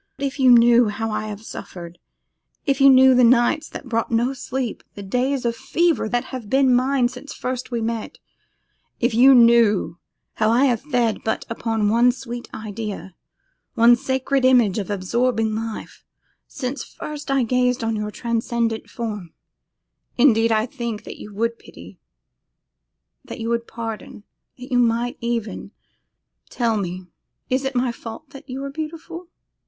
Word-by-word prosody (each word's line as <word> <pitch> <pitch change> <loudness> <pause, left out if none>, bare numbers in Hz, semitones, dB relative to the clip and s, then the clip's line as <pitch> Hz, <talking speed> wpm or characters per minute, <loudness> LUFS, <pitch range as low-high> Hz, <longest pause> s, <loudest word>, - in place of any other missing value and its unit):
If 275 0 -4
you 260 -1 +5
but 245 - +9
knew 235 -1 +5
how 225 +2 -3
I 215 0 -3
have 210 0 -7
suffered, 175 -5 -9 0.7
if 275 -1 0
you 275 - +8
but 270 - +8
knew 260 0 +7
the 250 0 +4
nights 245 +6 +3
that - - -9
brought 230 -2 -1
no 240 +3 +1
sleep, 260 -2 -4
the 205 - -8
days 250 +6 -1
of 235 0 0
fever 310 0 0
that 245 +3 0
have 240 -5 -6
been 265 -1 +4
mine 255 0 +2
since 255 +4 -10
first 255 0 -4
we 235 -2 -2
met, 225 0 -4 0.8
if 240 0 +1
you 260 +4 +7
but 245 - +8
knew 230 -6 +3 0.3
how 215 - +1
I 245 +5 +4
have 240 -5 +1
fed 245 -6 0
but 220 - -2
upon 225 -2 -1
one 235 +3 +4
sweet 240 -1 -8
idea, 210 -3 -6 0.6
one 235 +1 +6
sacred 265 +1 -1
image 240 -6 +4
of 200 - -5
absorbing 225 +3 0
life, 225 0 -6 0.4
since 260 +1 -5
first 300 -1 -8
I 275 -2 +2
gazed 250 +1 +1
on 225 0 -1
your 210 0 -3
transcendent 230 0 -2
form, 210 -7 -6 0.8
indeed 230 -3 +4
I 220 0 +2
think 235 -5 -5
that - - -9
you 210 - -9
would 230 +2 -1
pity, - - -14 1.2
that - - -9
you 225 0 -3
would 235 0 -1
pardon, 225 -3 -7 0.3
that 250 +1 -11
you 245 - +3
might 235 0 +1
even 230 -4 -3 0.8
'Tell 230 -3 0
me, 185 -2 -4 0.5
is 260 +1 +1
it 270 0 -3
my 245 0 +1
fault 235 +4 -10
that 275 0 -13
you 265 +2 -5
are 275 - -5
beautiful! 330 +3 -7
235 Hz, 165 wpm, -22 LUFS, 225-260 Hz, 1.2 s, but